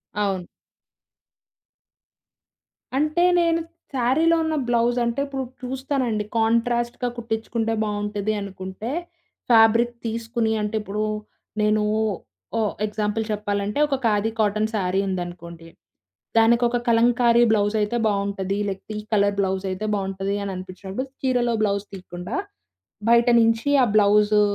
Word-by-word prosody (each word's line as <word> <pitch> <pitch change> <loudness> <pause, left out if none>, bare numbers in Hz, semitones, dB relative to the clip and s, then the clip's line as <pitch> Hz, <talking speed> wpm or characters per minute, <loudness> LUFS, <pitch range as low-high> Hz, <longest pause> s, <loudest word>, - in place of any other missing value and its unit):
అవును. 195 -3 -1 2.5
అంటే, 305 +4 +2 0.2
నేను 335 -1 +2 0.3
సారీలో 270 +7 +3
ఉన్న 320 -1 -1
బ్లౌజంటే, 240 +1 +1
ఇప్పుడు 270 -1 -3 0.2
చూస్తానండి, 255 -4 -2
కాంట్రాస్ట్‌గ 235 +2 +1
కుట్టిచుకుంటే 225 0 -2
బావుంటది 210 0 -2
అనుకుంటే, 190 +3 -6 0.6
ఫ్యాబ్రిక్ 230 +1 +5
తీసుకొని 230 0 -1
అంటే, 210 +1 -2
ఇప్పుడు 210 +1 -3 0.6
నేనూ 210 0 +2 0.8
ఓ - - +2 0.2
ఎగ్జాంపుల్ 210 +1 -1
చెప్పాలంటే, 205 +2 -2
ఒక 275 - 0
ఖాదీ 215 0 +2
కాటన్ 215 0 +1
సారీ 190 -1 +1
ఉందనుకోండి, 175 -2 -6 0.7
దానికి 235 +2 +5
ఒక 245 - 0
కలంకారీ 235 +1 +4
బ్లౌజైతే 210 +1 +1
బావుంటది. 200 -1 -1
లేకపోతే 195 +2 -5
ఈ - - -15
కలర్ 200 -1 +3
బ్లౌజైతే 190 +1 -1
బావుంటది 195 0 -2
అననిపించినప్పుడు. 190 +5 -6
చీరలో 245 -3 +1
బ్లౌజ్ 200 -1 0
తీయకుండా 180 -2 -7 0.7
బయట 235 +1 +5
నుంచి 225 +3 +2 0.2
ఆ - - +5
బ్లౌజు 210 0 +5
215 Hz, 105 wpm, -23 LUFS, 200-235 Hz, 2.5 s, ఫ్యాబ్రిక్